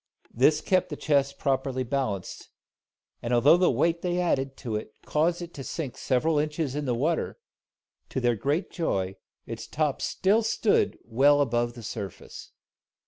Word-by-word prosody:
This 150 +5 +4
kept 185 -1 +1
the 150 - -4
chest 140 -2 +1
properly 135 -2 0
balanced; 115 -7 -3 0.7
and 120 - -3
although 125 +6 +6
the 180 0 +3
weight 165 +7 +1
they 180 -1 -1
added 135 -6 0
to 115 -5 -4
it 105 0 -5
caused 170 +3 +1
it 170 0 -9
to 135 - -7
sink 140 -3 -5
several 145 +4 +1
inches 150 -2 -1
in 150 0 -2
the 125 -2 0
water, 155 +7 -1 0.7
to - - -2
their 120 -2 +2
great 145 - -1
joy 95 - -2 0.3
its - - -7
top 150 -3 -1
still 205 +4 +2
stood 225 -1 +1
well 140 +6 +4
above 120 -3 +1
the 120 -1 -10
surface. 100 -4 -7
140 Hz, 160 wpm, -27 LUFS, 120-160 Hz, 0.7 s, although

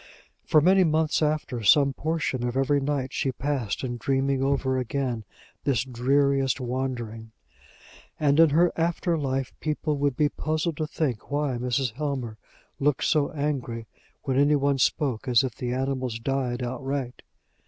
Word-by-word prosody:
For 155 - +4
many 185 +4 +5
months 160 -1 +1
after, 150 -5 -1
some 140 +5 +5
portion 155 -4 -2
of 125 +1 -1
every 135 +2 +2
night 135 -2 -2
she 135 - 0
passed 135 -5 -2
in 120 -2 -3
dreaming 135 +1 0
over 135 -1 +1
again 125 -2 -2 0.4
this 130 -4 +1
dreariest 135 +2 +1
wandering; 120 -3 -4 0.9
and 145 0 +3
in 165 -1 +7
her 170 +4 +4
after 170 +1 0
life 135 -3 -2
people 150 -1 -2
would 140 -3 0
be 150 - +4
puzzled 155 +2 -2
to 155 - -2
think 135 -8 -3
why 145 -4 -1
Mrs. 125 -1 -1
Helmer 130 -5 -4 0.4
looked 145 0 +1
so 150 -3 +2
angry 135 -6 -3 0.4
when 130 -1 0
any 145 +1 +4
one 140 -1 +1
spoke 135 -4 0
as 120 -1 +4
if 130 -3 -2
the 120 +2 -4
animals 130 -2 -2
died 125 0 -2
outright. 130 0 -4
135 Hz, 155 wpm, -26 LUFS, 125-150 Hz, 0.9 s, in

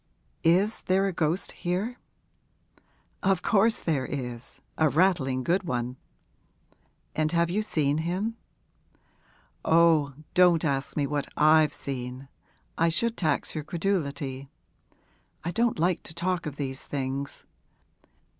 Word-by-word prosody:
Is 190 +6 +3
there 190 +1 +3
a 195 - -1
ghost 165 +3 0
here?' 195 +8 -3 1.2
'Of 190 -2 +1
course 220 +2 +3
there 150 -6 0
is 125 -3 -6 0.2
a 160 -1 +3
rattling 145 -6 +2
good 180 +7 +2
one.' 125 -7 -3 1.2
'And 155 0 +1
have 170 0 +2
you 210 +4 +1
seen 150 -7 +1
him?' 185 +7 -2 1.3
'Oh, 160 -4 +4 0.2
don't 175 -2 +5
ask 140 -1 -1
me 145 - +2
what 145 0 -2
I've 155 0 +5
seen 130 0 -5 0.5
I 165 0 +4
should 230 +8 +1
tax 155 -5 0
your 155 - -3
credulity. 145 -6 -2 0.9
I 170 - -2
don't 230 +3 +1
like 175 +2 +1
to 160 - -10
talk 175 -1 -1
of 145 - -5
these 135 -2 -4
things. 140 0 -4
160 Hz, 125 wpm, -27 LUFS, 140-180 Hz, 1.3 s, don't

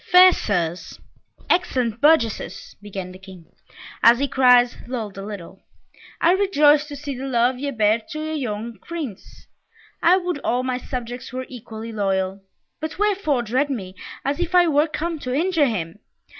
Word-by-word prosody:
"Fair 365 +1 +9
Sirs! 175 -4 -2 0.5
excellent 250 - 0
burgesses!" 290 -8 +1
began 195 -3 -7
the 185 - -12
King, 190 -3 -13 0.6
as 235 +1 +7
the 280 +2 0
cries 250 -2 +5
lulled 225 -5 -4
a 195 - -7
little. 195 -2 -9 0.6
"I 335 - +4
rejoice 300 -6 +4
to 290 - -7
see 285 -1 -5
the 265 +2 -5
love 250 0 +1
ye 285 +1 -2
bear 220 -3 +2
to 310 -1 -4
our - - -3
young 230 -6 -4
Prince! 300 - -8 0.6
I 355 +2 +5
would 355 -4 -2
all 250 -1 0
my 255 -1 -2
subjects 245 -1 -6
were 255 0 -4
equally 225 -2 -8
loyal! 195 -2 -1 0.4
But 315 0 -5
wherefore 390 -11 +1
dread 255 +6 0
me, 195 -9 -4 0.3
as 280 +3 -1
if 355 +1 -1
I 355 -1 +7
were 300 0 +3
come 325 +1 -3
to 255 -2 -3
injure 325 -1 +2
him? 175 -5 -4
255 Hz, 165 wpm, -22 LUFS, 215-305 Hz, 0.6 s, Fair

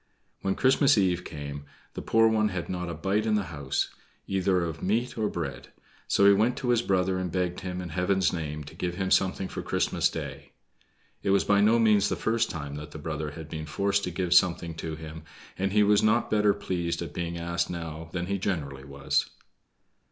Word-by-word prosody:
When 95 0 0
Christmas 135 -1 +4
eve 90 -3 +2
came 70 -1 -7 0.3
the - - -5
poor 115 0 +4
one 110 -1 +3
had 90 -4 -4
not 90 -1 -3
a 85 - -4
bite 100 +7 0
in 110 - +3
the 105 - +1
house, 70 -3 -1 0.3
either 95 -2 +1
of 80 -1 -5
meat 115 +6 0
or 110 -2 0
bread; 80 -6 -5 0.4
so 100 - +3
he 100 - +8
went 110 +5 +2
to 125 - -2
his 120 -1 +4
brother 95 -3 +1
and 90 -2 -3
begged 90 0 -1
him, 90 -1 -4
in 90 - -6
Heaven's 90 +1 +1
name, 75 -3 -4
to 75 - -11
give 90 +1 -3
him 95 0 -2
something 95 0 +2
for - - -5
Christmas - - +1
Day. - - -7 0.7
It - - -1
was 100 0 +4
by 100 0 +3
no 110 +3 +5
means 105 -3 +4
the - - 0
first 115 0 0
time 75 -3 -5
that 75 +1 -7
the 80 - -9
brother 75 0 -4
had 75 +1 -9
been 80 -1 -6
forced 100 +5 0
to - - -2
give 90 0 0
something 85 -2 +3
to 80 0 -4
him, 80 0 -8 0.3
and 95 0 -1
he 105 +1 +4
was 105 0 +4
not 110 +2 +2
better 105 -1 +3
pleased 85 -4 -2
at 75 -3 -8
being 85 0 -3
asked 85 0 -1
now 80 -2 -6
than 90 0 -2
he 100 +1 -2
generally 70 -9 -3
was. 70 +1 -1
90 Hz, 210 wpm, -27 LUFS, 80-100 Hz, 0.7 s, he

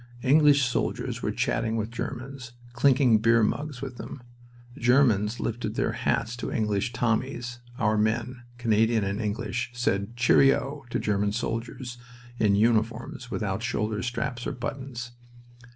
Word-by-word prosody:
English 145 +1 +5
soldiers 125 - -2
were - - -1
chatting 110 -1 0
with 110 0 -2
Germans, 125 +1 -6 0.2
clinking 125 -2 +4
beer 115 +1 +4
mugs 140 +3 -2
with 130 -3 -6
them. 125 - -8 0.5
The - - -13
Germans 120 -4 +3
lifted 120 +1 -3
their - - +1
hats 115 - -1
to - - -4
English 105 +1 0
"Tommies"; 120 0 -1 0.2
our 105 +1 +2
men, 120 +3 0 0.2
Canadian 115 -1 +2
and 100 +3 -2
English, 115 +3 -2
said 110 -2 -1
"Cheerio!" 135 +3 +3
to - - -1
German 100 -1 0
soldiers 120 +2 -4 0.4
in 105 -2 +4
uniforms 115 +3 0
without 105 -3 -2
shoulder 110 -2 -1
straps 120 0 -3
or - - -2
buttons. 125 -1 -5
120 Hz, 135 wpm, -27 LUFS, 110-125 Hz, 0.5 s, English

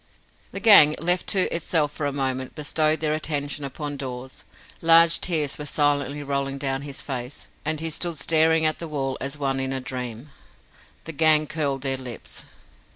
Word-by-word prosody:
The - - -5
gang, 155 -9 +8
left 175 +2 +1
to 190 -3 +3
itself 160 -3 0
for 150 -1 -3
a - - -2
moment, 130 -2 -3
bestowed 155 +1 0
their 155 -1 +1
attention 145 -2 -3
upon 145 +1 -5
Dawes. 130 -1 -8 0.4
Large 165 0 +5
tears 155 -6 0
were 150 - -6
silently 145 -1 0
rolling 140 -1 -2
down 135 -1 -2
his 140 -1 -6
face, 130 0 -6 0.2
and 155 0 -1
he 165 0 -3
stood 170 +1 -2
staring 160 +2 +3
at 155 - 0
the 170 - -6
wall 135 -3 -3
as 140 +2 -3
one 135 -2 -1
in 130 0 -2
a 135 - -2
dream. 125 +1 -6 0.7
The 165 - -5
gang 155 0 +3
curled 140 -4 -2
their 135 -1 +1
lips. 125 -3 -8
145 Hz, 175 wpm, -24 LUFS, 135-155 Hz, 0.7 s, gang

